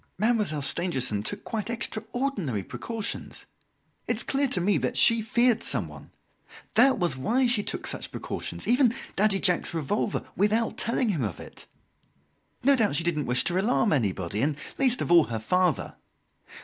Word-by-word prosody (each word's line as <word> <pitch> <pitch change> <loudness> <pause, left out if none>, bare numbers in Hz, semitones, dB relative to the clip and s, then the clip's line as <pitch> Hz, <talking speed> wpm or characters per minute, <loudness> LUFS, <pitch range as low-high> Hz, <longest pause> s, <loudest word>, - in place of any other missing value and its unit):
Mademoiselle 210 -10 0
Stangerson 135 - 0
took 105 - -4
quite 225 -2 -4
extraordinary 225 - -3
precautions! 225 - -5 0.6
It - - +1
is - - +2
clear 280 0 0
to 245 - 0
me 195 +3 +2
that - - -2
she 230 -1 +5
feared 240 0 +2
someone. - - -1 0.6
That 270 - +5
was 175 -8 0
why 235 - +1
she 240 -3 +3
took - - -4
such - - -4
precautions - - -5
even 245 0 +4 0.2
Daddy 200 -1 +2
Jacques's 180 -3 +1
revolver 190 +7 -2
without 215 +4 +1
telling 230 +1 +1
him 170 -9 -1
of 100 -6 -4
it. - - -11 1.0
No 280 +2 +5
doubt 220 - +1
she 165 - 0
didn't 155 -5 -1
wish 125 0 +1
to 180 +1 0
alarm 225 -1 +2
anybody, 100 - -1
and 145 +1 0 0.2
least 255 -2 +3
of - - -4
all, 170 -2 +7
her 115 - -4
father. 180 +10 0
205 Hz, 160 wpm, -26 LUFS, 150-235 Hz, 1.0 s, all